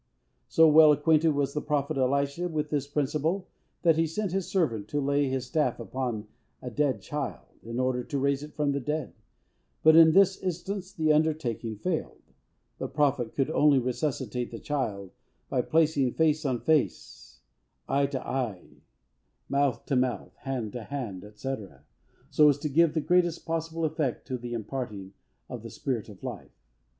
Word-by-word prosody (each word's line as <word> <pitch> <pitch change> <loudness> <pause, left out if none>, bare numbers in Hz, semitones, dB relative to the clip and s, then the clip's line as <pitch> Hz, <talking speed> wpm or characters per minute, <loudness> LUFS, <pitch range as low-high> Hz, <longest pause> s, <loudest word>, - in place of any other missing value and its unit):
So 160 0 +5
well 155 0 +8
acquainted 155 +1 +3
was 140 -1 0
the 150 - -2
Prophet 145 0 -1
Elisha 140 +5 0
with 150 -2 -2
this 145 -2 -1
principle, 150 +6 -1 0.4
that 165 -2 +4
he 165 0 +2
sent 195 +4 -3
his 190 0 -1
servant 155 - 0
to 145 - -1
lay 140 0 +1
his 130 -1 -2
staff 130 -2 0
upon 120 -2 -3 0.3
a 125 - -7
dead 135 -4 0
child, 145 -3 -4 0.2
in 115 +2 -5
order 130 -1 0
to 140 - -3
raise 140 0 +1
it 150 +1 -10
from 150 -2 +1
the 140 - -1
dead; 150 +1 -3 0.7
but, 160 0 +7
in 160 -1 +8
this 195 0 +4
instance, 185 +2 -4
the 155 -1 +2
undertaking 150 -8 0
failed. 165 - -3 0.6
The - - -2
Prophet 135 -5 0
could 140 +2 0
only 150 -2 +4
resuscitate 125 -1 -2
the 115 - -7
child 110 -9 -3 0.4
by 125 - +1
placing 150 -3 +2
face 155 -1 +2
on 125 -3 -1
face, 155 -3 -1 0.5
eye 140 0 +2
to 135 -2 -5
eye, 120 -9 -4 0.7
mouth 140 -2 +1
to 135 - 0
mouth, 125 -1 -1
hand 125 -6 -4
to 120 -3 -6
hand, 105 -8 -6
&c., 135 +5 -3 0.8
so 150 -1 +6
as 145 - +2
to 150 +1 -3
give 165 +2 +3
the 160 - +2
greatest 175 0 +1
possible 165 0 -2
effect 150 -5 -2
to 130 - -1
the 120 0 -6
imparting 110 -5 -5 0.3
of - - -7
the - - -8
spirit - - -3
of - - -13
life. - - -7
145 Hz, 170 wpm, -28 LUFS, 125-160 Hz, 0.8 s, well